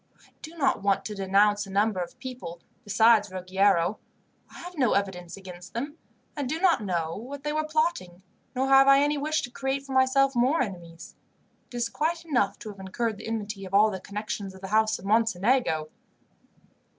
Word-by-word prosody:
I - - -28
do 320 +2 -10
not 275 -4 +1
want 195 0 +1
to 215 - -4
denounce 205 +1 +2
a - - -10
number 205 0 +1
of 180 +8 -5
people, 250 -10 -8 0.2
besides 215 0 +4
Ruggiero. 185 +1 +1 0.5
I - - -14
have 355 +1 -9
no 260 -7 +2
evidence 190 -3 -2
against 180 -1 -11
them, 285 +6 -4 0.4
and 285 -4 -3
do 315 +3 -2
not 350 -8 +3
know 170 -4 -2
what 270 +6 -8
they 295 0 -2
were 310 0 0
plotting, 310 - -1 0.3
nor 260 +1 0
have 270 0 +6
I 275 0 +7
any 290 0 +1
wish 310 +2 0
to 245 - -6
create 270 +2 -3
for 275 - -9
myself 265 +1 +3
more 255 +7 +3
enemies. 175 -5 -9 0.5
It - - -13
is 235 -1 0
quite 320 +7 -2
enough 245 -11 +1
to 215 - -7
have 200 -2 -11
incurred 215 +3 -3
the - - -8
enmity 215 -3 -4
of 190 +1 -4
all 210 +1 +5
the 190 - -5
connections 200 0 -5
of 190 - -14
the 190 - -7
house 220 +1 +2
of 185 - -13
Mocenigo." 215 -5 +1
220 Hz, 195 wpm, -27 LUFS, 190-270 Hz, 0.5 s, I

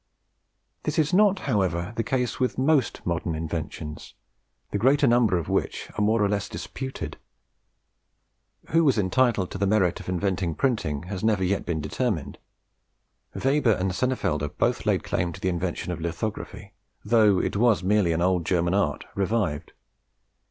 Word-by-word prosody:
This 150 - -3
is 155 +1 +2
not, 200 0 +5
however, 95 -5 0
the 115 - 0
case 125 -1 -1
with 125 - 0
most 135 -1 +1
modern 85 -1 -1
inventions, 80 -1 -5 0.6
the 100 - -1
greater 135 +6 +4
number 120 -6 +4
of 85 - -3
which - - -2
are - - -1
more 110 +1 +3
or - - +3
less 100 0 -2
disputed. 130 - -6 1.5
Who 165 +1 +4
was 135 -6 +3
entitled 105 -1 +2
to 95 - -5
the 100 - +1
merit 95 -4 +2
of - - -8
inventing 90 -2 -1
printing 95 - -1
has 95 +1 -6
never 105 -4 +2
yet 95 +2 -1
been 80 -3 -1
determined. 80 - -2 1.0
Weber 135 -3 +2
and 95 0 -1
Senefelder 100 -11 0
both - - -1
laid - - +2
claim 85 0 -1
to - - -10
the 95 - 0
invention 90 0 -2
of 90 - -5
lithography, 85 +6 -5 0.3
though 105 -3 +4
it - - -1
was 110 -3 +3
merely 100 -2 +3
an 85 +1 0
old 90 -2 +2
German 85 +1 +1
art 80 -8 0
revived. 100 -7 -1
100 Hz, 160 wpm, -25 LUFS, 85-120 Hz, 1.5 s, not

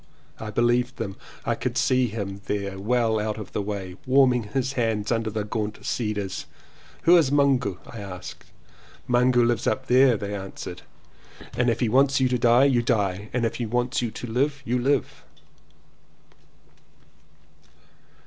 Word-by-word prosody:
I 110 - -6
be 110 +3 0
Heved 125 +1 +2
them. 100 -4 -5 0.3
I - - +1
could - - -3
see 130 -1 +3
him 100 -3 -5
there 100 -1 -3
well 110 +1 +1
out 105 0 -2
of 105 -3 -8
the - - -2
way, 100 -3 -5
warming 130 -3 +4
his 130 +5 -2
hands 110 -4 -1
under 115 -1 0
the 110 0 -3
gaunt 105 0 -4
cedars. 105 -5 -3 0.6
"Who 170 +2 +7
is 155 -6 +3
Mungu?" 135 -9 +2
I 115 - -9
asked. 95 -3 -8 0.6
"Mungu 125 0 +4
lives 120 -1 0
up 130 - 0
there," 130 -2 +5
they 100 0 -5
answered, 95 -1 -7 0.7
"and 125 0 +2
if 115 +1 -1
he 120 - +2
wants 135 +4 +3
you 130 - +3
to 125 -1 0
die 120 +3 +5
you 130 -4 +3
die, 105 -3 -1
and 120 -1 0
if 115 - -2
he 120 - -3
wants 125 +3 0
you 120 - -1
to 115 - -7
live 140 +4 -1
you 125 +2 0
live." 135 +4 0
120 Hz, 165 wpm, -25 LUFS, 105-125 Hz, 0.7 s, Who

